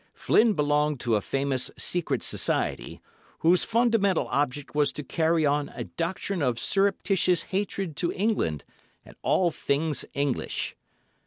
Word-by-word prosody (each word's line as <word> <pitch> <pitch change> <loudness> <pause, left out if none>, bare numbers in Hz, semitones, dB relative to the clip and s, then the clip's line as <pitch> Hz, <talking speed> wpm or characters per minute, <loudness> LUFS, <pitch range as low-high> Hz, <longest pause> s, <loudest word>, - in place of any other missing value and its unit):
Flynn 225 -1 +3
belonged 150 -2 +1
to 115 -2 +1
a 105 - +1
famous 135 +1 -1
secret 175 -2 -1
society, - - -2 0.4
whose 175 +2 +4
fundamental 225 -5 +2
object 145 0 -1
was 145 -1 +2
to 150 - -5
carry 160 +3 +1
on 145 0 +1
a - - -4
doctrine 175 +2 -3
of 125 -4 +1
surreptitious 195 - +1
hatred 195 -4 -2
to 170 - 0
England 185 - -1 0.4
and - - -15
all 175 -2 +2
things 150 +1 0
English. 140 -2 -2
160 Hz, 135 wpm, -26 LUFS, 140-190 Hz, 0.4 s, whose